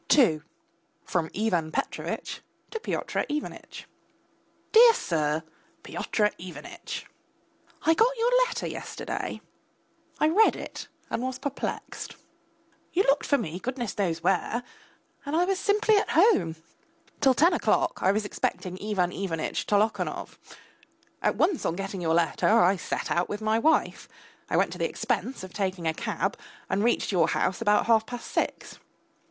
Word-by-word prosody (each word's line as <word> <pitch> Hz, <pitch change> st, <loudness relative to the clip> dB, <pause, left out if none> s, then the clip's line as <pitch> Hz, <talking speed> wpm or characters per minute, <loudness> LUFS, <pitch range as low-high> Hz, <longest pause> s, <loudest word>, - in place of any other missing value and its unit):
II 165 Hz, -, +5 dB, 0.6 s
(FROM 165 Hz, -3 st, -1 dB
IVAN 180 Hz, -7 st, 0 dB
PETROVITCH -, -, -3 dB, 0.3 s
TO 450 Hz, -, -3 dB
PYOTR -, -, -2 dB
IVANITCH) 300 Hz, 0 st, -5 dB, 0.9 s
DEAR 465 Hz, +1 st, +9 dB
SIR, 155 Hz, -, 0 dB, 0.4 s
PYOTR 210 Hz, -1 st, 0 dB
IVANITCH! 340 Hz, -, -7 dB, 0.8 s
I 325 Hz, -, +5 dB
got 475 Hz, +8 st, +3 dB
your 465 Hz, +2 st, +2 dB, 0.2 s
letter 475 Hz, -, -4 dB
yesterday, -, -, -5 dB, 0.8 s
I 305 Hz, -, +4 dB
read 420 Hz, +7 st, +5 dB
it -, -, -7 dB, 0.2 s
and -, -, -1 dB
was 255 Hz, 0 st, -3 dB
perplexed. 280 Hz, -1 st, -5 dB, 0.8 s
You 375 Hz, -, +3 dB
looked 275 Hz, -3 st, +2 dB
for 285 Hz, -, +4 dB
me, 180 Hz, -, -4 dB
goodness 240 Hz, -3 st, -4 dB
knows 170 Hz, -5 st, -1 dB
where, 195 Hz, +6 st, +1 dB, 0.6 s
and 285 Hz, +2 st, -3 dB
I 345 Hz, +2 st, +3 dB
was 380 Hz, 0 st, 0 dB
simply 425 Hz, +1 st, +3 dB
at -, -, +1 dB
home. 260 Hz, -, +4 dB, 0.6 s
Till 265 Hz, -2 st, +4 dB
ten 335 Hz, +8 st, +5 dB
o'clock -, -, +1 dB
I 190 Hz, -, +4 dB
was 210 Hz, +1 st, 0 dB
expecting 185 Hz, -2 st, -3 dB
Ivan 190 Hz, -4 st, 0 dB
Ivanitch 170 Hz, -5 st, -3 dB
Tolokonov. 210 Hz, +2 st, 0 dB, 0.8 s
At -, -, +1 dB
once 360 Hz, -6 st, +1 dB
on 165 Hz, -, 0 dB
getting 195 Hz, 0 st, -4 dB
your 165 Hz, -1 st, +1 dB
letter 170 Hz, -1 st, +2 dB
I 200 Hz, -4 st, +5 dB
set 180 Hz, -, -4 dB
out 175 Hz, +1 st, +1 dB
with 205 Hz, -, -3 dB
my 220 Hz, +1 st, +1 dB
wife, 320 Hz, +7 st, +1 dB, 0.4 s
I -, -, +1 dB
went -, -, +2 dB
to -, -, -7 dB
the -, -, 0 dB
expense 260 Hz, -6 st, -2 dB
of 185 Hz, -2 st, -9 dB
taking 190 Hz, -4 st, -2 dB
a 160 Hz, -, +1 dB
cab, -, -, -2 dB, 0.3 s
and 195 Hz, +2 st, +1 dB
reached 240 Hz, -1 st, +1 dB
your 180 Hz, -3 st, +3 dB
house 190 Hz, -, 0 dB
about 210 Hz, -2 st, +3 dB
half 225 Hz, -1 st, +3 dB
past 245 Hz, -1 st, -7 dB
six. -, -, -2 dB
215 Hz, 150 wpm, -27 LUFS, 180-300 Hz, 0.9 s, DEAR